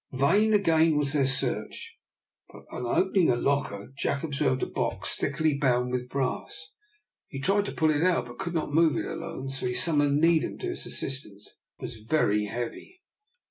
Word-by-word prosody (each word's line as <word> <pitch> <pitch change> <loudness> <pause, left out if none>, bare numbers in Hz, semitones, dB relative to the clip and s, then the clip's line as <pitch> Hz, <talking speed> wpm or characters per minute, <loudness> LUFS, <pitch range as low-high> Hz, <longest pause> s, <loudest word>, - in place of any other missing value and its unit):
Vain 195 +12 +3
again 165 -6 +3
was 145 0 0
their 140 -3 +2
search, 135 - -2 0.6
but - - -13
on 125 - -4
opening 190 +5 +2
a 120 - +4
locker 130 -4 -1
Jack 140 - -1
observed 140 -4 0
a - - +2
box - - -2
thickly 155 -3 0
bound 125 -3 +1
with 125 0 -3
brass. 140 +4 -3 0.6
He 135 - -7
tried 200 +7 +1
to - - -4
pull 155 -1 +2
it 150 0 0
out, 180 0 +2
but 120 0 -12
could 170 0 -3
not 155 -2 -2
move 160 -1 +4
it - - -2
alone, 135 +1 -5
so 135 -2 -3
he 125 - -2
summoned 145 -4 +2
Needham 165 0 +2
to 370 - -4
his 360 - -5
assistance. 105 -7 -5 0.3
It - - -14
was 115 - -7
very 105 -3 +1
heavy. 120 - -6
140 Hz, 180 wpm, -27 LUFS, 125-165 Hz, 0.6 s, a